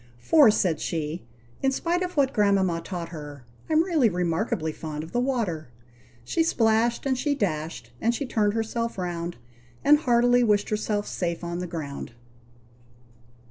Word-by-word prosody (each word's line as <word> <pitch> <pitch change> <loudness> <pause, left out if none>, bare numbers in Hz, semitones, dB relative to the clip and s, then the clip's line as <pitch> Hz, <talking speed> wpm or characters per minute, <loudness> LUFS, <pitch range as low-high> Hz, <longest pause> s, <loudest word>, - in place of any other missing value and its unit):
"For," 290 - +6
said 180 -6 +1
she, 155 -3 -3 0.3
in 270 - +2
spite 340 +6 0
of 360 -3 -4
what 275 -1 +3
grandmama 195 -5 +2
taught 170 -1 -5
her, 145 -5 -9 0.2
"I'm 315 +1 +4
really 320 -10 +3
remarkably 180 0 -1
fond 155 -1 -6
of 160 - -10
the 240 - 0
water." 225 - -1 0.6
She 125 - 0
splashed, 230 -6 +2
and 265 -1 +2
she 285 +3 0
dashed, 155 - -3
and 235 +1 +2
she 280 - -3
turned 215 -4 +1
herself 230 0 -2
round, 175 -2 -3 0.5
And 295 +1 +6
heartily 245 -2 +4
wished 210 -3 +2
herself 210 -1 -1
safe 170 -1 -3
on 170 0 -3
the 180 - -4
ground. 145 -7 -6
205 Hz, 155 wpm, -26 LUFS, 165-245 Hz, 0.6 s, For